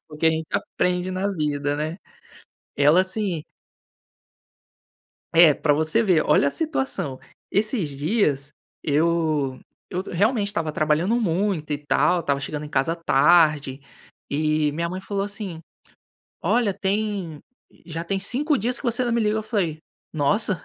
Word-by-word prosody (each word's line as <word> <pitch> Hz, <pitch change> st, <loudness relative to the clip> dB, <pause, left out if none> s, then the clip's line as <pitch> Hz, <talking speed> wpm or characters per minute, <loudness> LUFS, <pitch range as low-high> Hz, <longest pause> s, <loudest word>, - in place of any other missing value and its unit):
Porque 155 Hz, +1 st, -1 dB
a -, -, +6 dB
gente 160 Hz, 0 st, -2 dB
aprende 180 Hz, 0 st, -1 dB
na 185 Hz, +2 st, -1 dB
vida, 145 Hz, -5 st, -1 dB
né. 155 Hz, +4 st, -3 dB, 0.8 s
Ela 150 Hz, +5 st, +5 dB
assim 185 Hz, -4 st, -2 dB, 1.9 s
É 165 Hz, -2 st, +7 dB
para 145 Hz, +1 st, +1 dB
você 155 Hz, +9 st, +2 dB
ver, 180 Hz, -7 st, +3 dB
olha 150 Hz, -1 st, +4 dB
a -, -, 0 dB
situação. 265 Hz, -, -2 dB, 0.3 s
Esses 210 Hz, -, 0 dB
dias, 145 Hz, -1 st, 0 dB, 0.3 s
eu 155 Hz, -3 st, +1 dB, 0.3 s
eu 180 Hz, -, -2 dB
realmente 205 Hz, +4 st, +1 dB
estava 165 Hz, -6 st, -2 dB
trabalhando 155 Hz, +8 st, +1 dB
muito, 180 Hz, -4 st, -1 dB
e 145 Hz, -, 0 dB
tal, 150 Hz, +4 st, +2 dB
estava 140 Hz, -3 st, 0 dB
chegando 150 Hz, +1 st, -5 dB
em -, -, -9 dB
casa 140 Hz, +4 st, 0 dB
tarde, 150 Hz, -3 st, +3 dB, 0.5 s
e 155 Hz, 0 st, +1 dB
minha 170 Hz, +3 st, -2 dB
mãe 185 Hz, +2 st, -4 dB
falou, 195 Hz, 0 st, -2 dB
assim: 200 Hz, -4 st, -6 dB, 0.8 s
"Olha 210 Hz, +2 st, +2 dB
tem 195 Hz, -5 st, -2 dB, 0.4 s
já 165 Hz, 0 st, -5 dB
tem 195 Hz, +3 st, -1 dB
5 285 Hz, +9 st, +1 dB
dias 240 Hz, +3 st, -1 dB
que -, -, -14 dB
você 245 Hz, +1 st, +1 dB
não 240 Hz, -, 0 dB
me 235 Hz, -, +2 dB
liga". 215 Hz, 0 st, +1 dB
Eu 220 Hz, -, -1 dB
falei: 195 Hz, -8 st, -1 dB, 0.3 s
"Nossa, 180 Hz, +6 st, +1 dB
170 Hz, 145 wpm, -23 LUFS, 150-205 Hz, 1.9 s, É